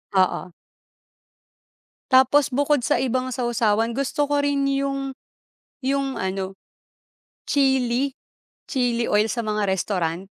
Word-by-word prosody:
Oo. 185 -1 +1 1.6
Tapos 265 +3 +5
bukod 285 +1 +1
sa - - +1
ibang 255 0 -1
sawsawan, 235 -3 0
gusto 275 +2 0
ko 285 0 +1
rin 285 -1 +1
'yung 275 0 -1 0.7
'yung 275 0 0
ano, 190 0 -3 0.9
chili 265 -1 +1 0.6
chili 245 -4 0
oil 210 +1 +3
sa 235 +3 -1
mga 210 -1 -1
restaurant. 185 -2 -1
255 Hz, 105 wpm, -23 LUFS, 210-275 Hz, 1.6 s, Tapos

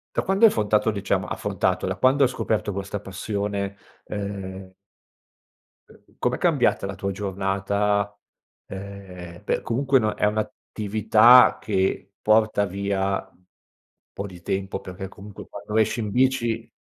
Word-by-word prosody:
da - - +2
quando 195 +4 +4
hai 220 - +7
affrontato 105 0 +1
diciamo 100 -2 -1
affrontato, - - -1
da - - -1
quando 135 +2 +4
hai 130 - +4
scoperto 110 -4 -1
questa 100 +1 -4
passione, 100 0 -3 0.3
ehm 95 -2 -6 1.2
uhm, - - -22
com'è - - 0
cambiata - - +2
la 95 0 -5
tua 100 +2 -3
giornata, 100 +1 -1 0.5
ehm, 95 -3 -9
beh - - -1
comunque 135 +3 +2
no 110 -2 0
è - - +1
un'attività 110 +3 +4
che 95 -1 -1
porta 110 -1 +3
via 100 0 -1
un 90 - -31 0.7
po' 100 - -5
di 90 -3 -12
tempo, 95 +1 -3
perché 95 0 -7
comunque 100 +1 -11
quando 105 +1 -5
esci 110 +1 +2
in 105 -2 -3
bici, 120 -2 +1
100 Hz, 135 wpm, -24 LUFS, 95-110 Hz, 1.2 s, hai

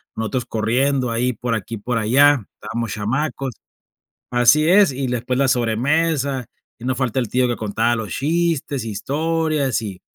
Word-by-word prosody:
nosotros 110 +3 -2
corriendo 125 +3 0
ahí 125 +2 0
por 115 +1 -2
aquí, 115 +1 -5
por 120 +4 -2
allá, 130 +3 +4 0.2
estábamos 115 -1 -4
chamacos. 135 +4 -2 0.8
Así 120 +6 +4
es, 195 -1 +5
y 135 0 -3
después 125 +1 -2
la 140 - +3
sobremesa, 135 +3 +1 0.3
y 115 - -14
no 130 0 0
falta 130 -1 -1
el 120 -4 -2
tío 125 +2 +2
que 120 - -1
contaba 110 +2 0
los 110 -3 -4
chistes, 155 -3 -1
historias 150 +3 -1
y 100 -4 -7
125 Hz, 155 wpm, -20 LUFS, 115-140 Hz, 0.8 s, es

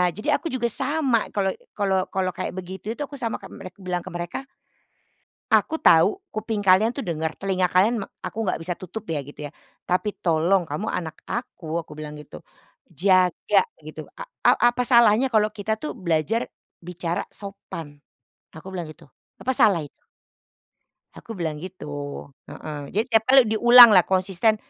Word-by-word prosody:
jadi 210 +8 -4
aku - - -25
juga 240 -2 0
sama. 270 -2 +1 0.2
kalo 195 -1 +1 0.3
kalo 200 -2 0 0.2
kalo 190 -1 0
kayak - - -4
begitu 185 +2 -8
itu 265 - -10
aku 280 0 -9
sama 230 -3 -2
kayak - - -11
merek 185 -2 -10
bilang 180 -1 -3
ke - - -7
mereka, 175 +4 -4 1.1
"Aku 320 - +3
tahu, 165 - +5 0.2
kuping 215 -1 -3
kalian 190 +4 +5
tuh 275 - -4
denger, 160 -2 -3
telinga 185 -2 0
kalian 200 +6 +4
me - - -5 0.2
aku - - -7
nggak 185 - 0
bisa 175 +2 -3
tutup 190 +4 -7
ya" 150 - -1
gitu 145 - -14
ya. - - -23 0.4
"Tapi 190 +4 0
tolong, 175 +2 +2
kamu 150 +1 -4
anak 165 -3 -4
aku" 170 -9 -4
aku 150 - -13
bilang 150 -1 -7
gitu. 150 - -12 0.5
Jaga 185 0 +3 0.2
gitu. - - -9
"A - - -4 0.2
a - - +8 0.2
apa 250 - -1
salahnya 235 0 +5
kalau 215 -1 +3
kita 215 +1 -2
tuh 305 - -4
belajar 185 - -1 0.3
bicara 170 -1 -3
sopan?" 170 -7 -9 0.6
Aku 160 +4 -11
bilang 175 -3 -4
gitu. 155 - -16 0.4
"Apa 260 - -1
salah 190 -6 +4
itu?" 145 - -16 1.2
Aku 230 - -14
bilang 155 -3 -3
gitu. 185 +1 -9 0.6
Heeh. 155 -1 -8 0.2
Jadi 215 - +2
tiap 225 0 +4
kali 265 +1 +7
diulang 240 +2 +9
lah 180 - +5
konsisten, 190 +3 +2
190 Hz, 170 wpm, -23 LUFS, 170-220 Hz, 1.2 s, diulang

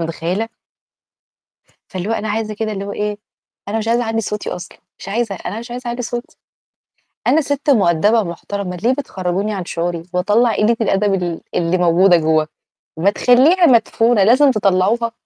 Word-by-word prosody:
متخيلة؟ 175 +7 -3 1.4
فاللي 185 +2 -5
هو - - +1
أنا 220 -1 -3
عايزة 215 0 -2
كده 215 0 -3
اللي 200 -1 -5
هو 200 - -5
إيه؟ 210 0 -3 0.5
أنا 215 - -2
مش 225 0 -3
عايزة 235 +1 +2
أعلِّي 225 0 -1
صوتي 210 0 -4
أصلًا، 175 - -8 0.2
مش - - -8
عايزة، 215 -1 -1
أنا 205 +4 -6
مش 235 +1 -10
عايزة 245 0 -6
أعلِّي 240 +1 -3
صوتي، 240 +1 -6 0.9
أنا 315 - +4
سِت 285 0 -2
مؤدبة 205 - +3
ومحترمة، 180 +1 -5
ليه 230 +8 +1
بتخرّجوني 195 -5 -3
عن 185 -3 -4
شعوري 170 -1 -3
وأطلّع 210 +5 +2
قِلّة 225 +3 +2
الأدب 205 -1 +1
ال 170 -2 -4
اللي 170 +1 +1
موجودة 175 +1 +4
جوا؟ 155 -1 +2 0.5
ما 175 +5 +3
تخليها 265 - +4
مدفونة 230 -4 +3
لازم 260 +7 +5
تطلعوها. 215 +2 +1
210 Hz, 165 wpm, -18 LUFS, 185-235 Hz, 1.4 s, لازم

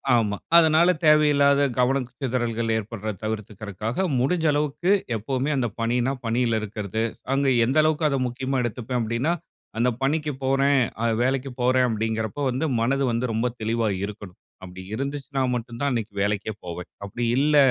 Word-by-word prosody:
ஆமா. 105 -3 +1 0.2
அதனால 165 +2 +5
தேவையில்லாத 145 -2 +5 0.2
கவன 130 +2 +2 0.2
சிதறல்கள் 120 -3 -1
ஏற்படுறத 110 -1 -4
தவிர்த்துக்கிறதுக்காக, 110 - -3
முடிஞ்ச 160 +6 +1
அளவுக்கு 150 +5 0 0.2
எப்பவுமே 130 +6 -2
அந்த 130 -3 +1
பணினா, 120 +3 +1
பணியில 115 -1 +1
இருக்கிறது. 105 0 -4 0.3
அங்க 140 0 +1 0.2
எந்த 130 +6 0
அளவுக்கு 155 0 +1
அத 140 - 0
முக்கியமா 130 +2 -2
எடுத்துப்பேன் 120 +2 -3
அப்படீன்னா, 115 +8 0 0.5
"அந்த 125 +2 +3
பணிக்குப் 150 -1 -1
போறேன், 135 +1 +3 0.2
அது 115 - +2
வேலைக்குப் 130 0 -1
போறேன்." 125 0 +3
அப்படீங்கிறப்போ 110 +3 -2
வந்து 130 +6 -1
மனது 135 +4 +1
வந்து 115 +1 -1
ரொம்ப 115 +3 0
தெளிவா 115 0 0 0.2
இருக்கணும். 100 -3 -10 0.2
அப்படி 90 0 -9
இருந்துச்சுன்னா 140 +2 -3
மட்டும் 120 0 -6
தான் 140 - +2
அன்னைக்கு 110 -4 -3
வேலைக்கே 105 +1 -1
போவேன். 90 +1 -6
அப்படி 110 +4 -3
இல்ல 150 +1 +3
125 Hz, 145 wpm, -24 LUFS, 110-140 Hz, 0.5 s, அதனால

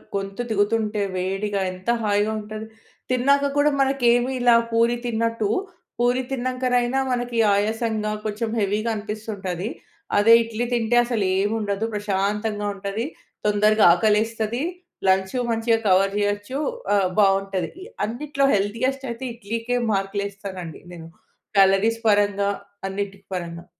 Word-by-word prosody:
గొంతు 195 +2 -3
దిగుతుంటే 210 0 +1 0.2
వేడిగా 195 +2 -1
ఎంత 185 +2 -12
హాయిగా 205 0 +1
ఉంటది. 215 +1 -7 0.5
తిన్నాక 280 +3 +3
కూడా 295 +1 +5
మనకేమి 250 -2 +3
ఇలా 245 -1 +5 0.2
పూరి 230 +1 +3
తిన్నట్టు, 230 -2 0 0.5
పూరి 245 +1 +2
తిన్నంకనైనా 255 0 0
మనకి 245 -1 -2 0.2
ఆయాసంగా 215 +1 0
కొంచెం 220 +1 -2
హెవీగా 210 +3 0
అనిపిస్తుంటుంది. 210 -2 -4 0.5
అదే 225 +3 +6
ఇడ్లీ 230 +1 -3
తింటే 235 0 +2
అసలేం 200 -4 0
ఉండదు. 205 +1 -1
ప్రశాంతంగా 205 +1 -1
ఉంటది. 200 +4 -3 0.4
తొందరగా 210 +1 +4
ఆకలేస్తది. 220 +4 +1 0.5
లంచు 190 +5 +2
మంచిగా 225 0 +2
కవర్ 195 +1 +4
చేయొచ్చు. 205 +6 -1 0.4
ఆహ్, 190 -2 +2
బావుంటది. 195 - 0 0.2
అన్నిట్లో 275 +4 -1
హెల్తీయెస్ట్ 230 +7 0
అయితే 235 +3 -6
ఇడ్లీకే 230 +2 -3 0.2
మార్కులు 195 +1 -1
ఏస్తానండి 190 -5 -8
నేను. 165 -1 -10 0.5
క్యాలరీస్ 195 +4 +4
పరంగా, 205 -1 +3 0.4
అన్నిటికి 200 0 -5
పరంగా. 170 -1 -5
210 Hz, 115 wpm, -23 LUFS, 200-235 Hz, 0.5 s, అదే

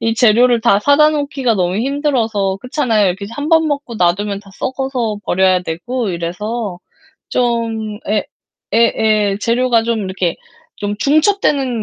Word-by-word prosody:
이 225 0 0
재료를 240 +1 +4
다 225 -3 +4
사다 285 +5 +5
놓기가 280 -5 -1
너무 180 0 0
힘들어서 230 -8 0
그렇잖아요. 240 -5 +1
이렇게 190 +3 -2
1 290 +3 -4
번 320 -1 +4
먹고 280 -5 -3
놔두면 200 +2 0
다 200 -1 -17
썩어서 260 -4 -2
버려야 185 0 +2
되고 195 +8 -3
이래서 180 +4 -4 0.5
좀 230 -3 -1
예 210 0 +1 0.5
예예. 215 -3 +2
재료가 235 +1 +2
좀 230 -1 -1
이렇게 185 -2 -2 0.4
좀 205 0 -3
중첩되는 285 - +1
225 Hz, 295 characters per minute, -16 LUFS, 200-255 Hz, 0.5 s, 사다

